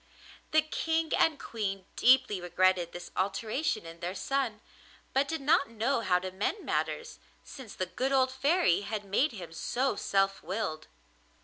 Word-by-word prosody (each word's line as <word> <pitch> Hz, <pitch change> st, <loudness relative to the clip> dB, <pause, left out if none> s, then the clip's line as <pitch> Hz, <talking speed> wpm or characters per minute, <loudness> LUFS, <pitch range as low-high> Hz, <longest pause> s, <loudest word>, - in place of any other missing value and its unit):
The 310 Hz, 0 st, +4 dB
King 320 Hz, +1 st, -1 dB
and 315 Hz, -3 st, +3 dB
Queen 195 Hz, -4 st, -4 dB
deeply 250 Hz, -6 st, +4 dB
regretted 180 Hz, 0 st, +2 dB
this 175 Hz, 0 st, -8 dB
alteration 215 Hz, -, -1 dB
in 165 Hz, 0 st, -10 dB
their 180 Hz, +2 st, -4 dB
son, 255 Hz, -1 st, -1 dB, 0.5 s
but 275 Hz, +1 st, +2 dB
did 320 Hz, -1 st, -3 dB
not 280 Hz, -1 st, +3 dB
know 230 Hz, +4 st, 0 dB
how 185 Hz, -5 st, +3 dB
to 185 Hz, +1 st, -4 dB
mend 210 Hz, -, -2 dB
matters, 475 Hz, 0 st, -2 dB, 0.2 s
since 260 Hz, -6 st, -10 dB
the 185 Hz, -, -1 dB
good 255 Hz, +9 st, -2 dB
old 260 Hz, -1 st, +3 dB
Fairy 275 Hz, -, +2 dB
had 205 Hz, 0 st, -4 dB
made 235 Hz, +9 st, +1 dB
him 175 Hz, -6 st, -8 dB
so 255 Hz, +8 st, -1 dB
self 195 Hz, -1 st, +1 dB
willed. 185 Hz, -6 st, -3 dB
215 Hz, 155 wpm, -30 LUFS, 185-275 Hz, 0.5 s, The